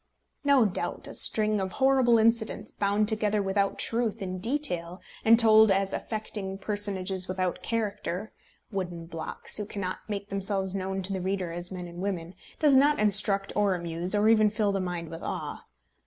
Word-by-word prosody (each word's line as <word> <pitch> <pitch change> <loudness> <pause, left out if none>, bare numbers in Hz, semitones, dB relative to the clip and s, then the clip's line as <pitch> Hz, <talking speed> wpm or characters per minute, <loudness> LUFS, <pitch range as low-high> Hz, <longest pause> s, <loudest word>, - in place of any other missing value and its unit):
No 280 -4 +4
doubt, 195 - -3
a - - -8
string 215 -1 +2
of 190 -1 -4
horrible 265 -3 +4
incidents, 225 0 +1
bound 205 +1 0
together 215 -1 0
without 200 0 0
truth 230 -2 -1
in 185 -1 -5
detail, 185 - -2 0.2
and 230 +1 +6
told 220 -2 +6
as 195 0 +1
affecting 210 -3 -5
personages 195 -2 -2
without 185 -1 -2
character, 210 -3 -3 0.4
wooden 175 -4 -4
blocks, 165 -1 -6
who 210 - -3
cannot 190 -3 -4
make 200 -1 -5
themselves 195 -1 -1
known 190 0 -3
to 195 +2 -2
the 190 - -3
reader 185 -2 -2
as 175 +2 -4
men 180 -1 -6
and 170 0 -10
women, 180 -3 -4 0.2
does 295 -3 +4
not 290 +3 +4
instruct 200 -1 +5
or 205 -2 +2
amuse, 170 +2 -3
or 210 +1 +3
even 215 -1 +5
fill 210 -1 0
the 195 -1 -1
mind 175 -3 -4
with 165 - -8
awe. - - -5
200 Hz, 170 wpm, -27 LUFS, 185-215 Hz, 0.4 s, and